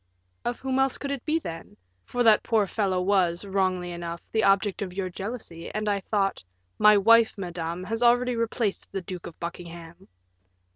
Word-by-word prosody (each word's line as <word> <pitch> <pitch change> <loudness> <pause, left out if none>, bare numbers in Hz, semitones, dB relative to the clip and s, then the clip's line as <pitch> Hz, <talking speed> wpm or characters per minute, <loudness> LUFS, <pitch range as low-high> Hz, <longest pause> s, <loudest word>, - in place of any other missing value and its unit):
"Of 240 0 -2
whom 265 0 0
else 270 -1 +2
could 280 - -4
it 275 -3 -4
be, 310 +1 +2
then? 165 - -7 0.3
for 245 0 -1
that 220 -2 +6
poor 220 -3 +2
fellow 195 -2 0
was, 180 -1 +1
wrongly 185 -2 0
enough, 170 0 -5
the 220 0 +1
object 195 0 +2
of 185 -3 -4
your 185 -1 -3
jealousy, 195 -4 -6
and 215 0 -2
I 200 -1 +1
thought 195 - -1 0.2
" 90 0 -45
"My 210 0 +7
wife, 225 +2 +5
madame, 175 -2 -4
has 225 +4 -3
already 245 +1 +4
replaced 230 -2 -2
the 195 - -4
Duke 180 0 -7
of 165 - -12
Buckingham." 170 +1 -8
195 Hz, 185 wpm, -26 LUFS, 175-225 Hz, 0.3 s, My